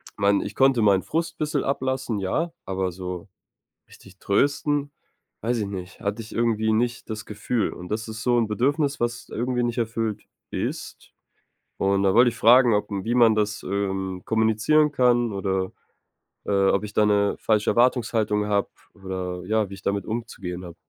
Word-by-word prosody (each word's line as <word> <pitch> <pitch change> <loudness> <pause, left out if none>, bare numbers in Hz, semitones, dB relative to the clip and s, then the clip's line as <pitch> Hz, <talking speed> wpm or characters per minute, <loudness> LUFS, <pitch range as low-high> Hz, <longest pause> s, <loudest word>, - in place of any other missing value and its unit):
Mein 100 0 +2
ich 105 - -6
konnte 135 -3 +4
meinen 100 -3 +4
Frust 165 +2 -2
ein - - -47
bisschen 150 -2 0
ablassen, 130 -4 -1
ja, 160 - -1
aber 95 -1 -2
so 90 +1 -6 0.6
richtig 95 0 -17
trösten, 145 +7 +1 0.5
weiß 120 +2 0
ich 100 - -2
nicht. 95 -2 -7
Hatte 100 +3 -3
ich 110 - -10
irgendwie 110 -2 +1
nicht 120 +1 -1
das 110 0 -5
Gefühl. 110 +2 -2
Und 90 0 -9
das 110 +2 -3
ist 110 0 -6
so 120 -1 +3
'n 115 - +2
Bedürfnis, 140 +6 0
was 120 0 -2
irgendwie 125 +1 -1
nicht 120 0 -2
erfüllt 115 -2 -2 0.3
ist. - - -5 0.7
Und 100 0 +1
da 95 -1 +3
wollte 120 +2 +6
ich 115 - -8
fragen, 120 0 +6
ob 105 0 +1
wie 105 +4 -2
man 115 -3 +5
das, 105 -1 -1
ähm, 95 -2 -2
kommunizieren 110 +8 +2
kann 120 -3 +3
oder, 95 -1 -1 0.7
äh, 100 -1 +2
ob 100 - +1
ich 105 - -9
da 105 - +3
'ne 100 -1 +2
falsche 105 -1 +1
Erwartungshaltung 115 -4 +2
habe 100 -1 0 0.2
oder, 95 -2 -5
äh, - - -11
ja, 110 -2 +1
wie 100 - -9
ich 95 - -10
damit 100 -1 -1
umzugehen 100 -6 -5
habe. 85 -2 -9
110 Hz, 180 wpm, -24 LUFS, 100-120 Hz, 0.7 s, wollte